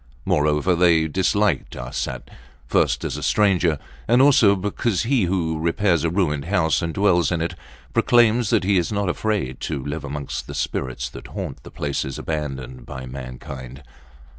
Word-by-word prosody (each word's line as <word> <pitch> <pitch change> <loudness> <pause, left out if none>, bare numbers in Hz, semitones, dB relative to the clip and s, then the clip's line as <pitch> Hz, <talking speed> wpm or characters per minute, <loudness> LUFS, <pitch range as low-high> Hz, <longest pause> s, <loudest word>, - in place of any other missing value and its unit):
Moreover, 75 +4 +2
they 85 -2 +4
disliked 95 +5 +1
Arsat, 60 0 -5 0.3
first - - +1
as - - -3
a - - -6
stranger, 90 -7 +2 0.3
and 120 +2 +4
also 130 -7 +6
because 100 0 -1
he 120 -4 +2
who 85 -3 -1
repairs 85 0 +1
a 85 - +2
ruined 80 -5 0
house, 85 -4 +2
and 85 -1 -2
dwells 90 -1 +2
in 85 - 0
it, 85 +1 -2 0.4
proclaims 120 -1 +4
that - - +2
he 95 0 +3
is 85 - -2
not 100 -2 0
afraid 90 -10 -1
to 65 - -4
live 75 +1 -4
amongst 70 0 -5
the - - -7
spirits 65 -2 -2
that - - -10
haunt - - -6
the - - -12
places 70 -2 -3
abandoned 65 -5 -4
by 65 0 -7
mankind. 65 +1 -8
85 Hz, 165 wpm, -22 LUFS, 70-100 Hz, 0.4 s, also